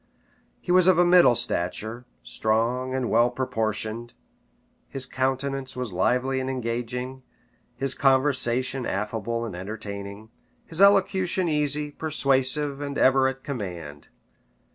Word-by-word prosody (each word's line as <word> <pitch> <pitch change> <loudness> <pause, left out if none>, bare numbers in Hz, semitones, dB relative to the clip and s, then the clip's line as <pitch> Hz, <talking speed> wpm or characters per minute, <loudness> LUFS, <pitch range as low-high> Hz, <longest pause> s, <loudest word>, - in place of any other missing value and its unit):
He - - -4
was 180 0 +5
of 185 -2 +5
a 175 - +5
middle 175 -8 +6
stature, 110 +2 -2 0.2
strong 115 - 0
and 130 -2 -1
well 120 +2 +3
proportioned; 115 -2 -3 0.8
his 135 -1 +1
countenance 130 +1 -2
was 125 -6 -4
lively 125 +8 +1
and 130 0 -3
engaging; 125 +1 -4 0.5
his 135 -1 -1
conversation 130 -2 +1
affable 110 +3 -3
and 105 -6 -6
entertaining; 100 +2 -7 0.3
his 165 +3 -1
elocution 190 -2 +3
easy, 150 -1 -1
persuasive, 140 -1 0
and 140 -1 -4
ever 130 0 +4
at 135 0 -5
command. 90 - -6
130 Hz, 120 wpm, -25 LUFS, 110-140 Hz, 0.8 s, middle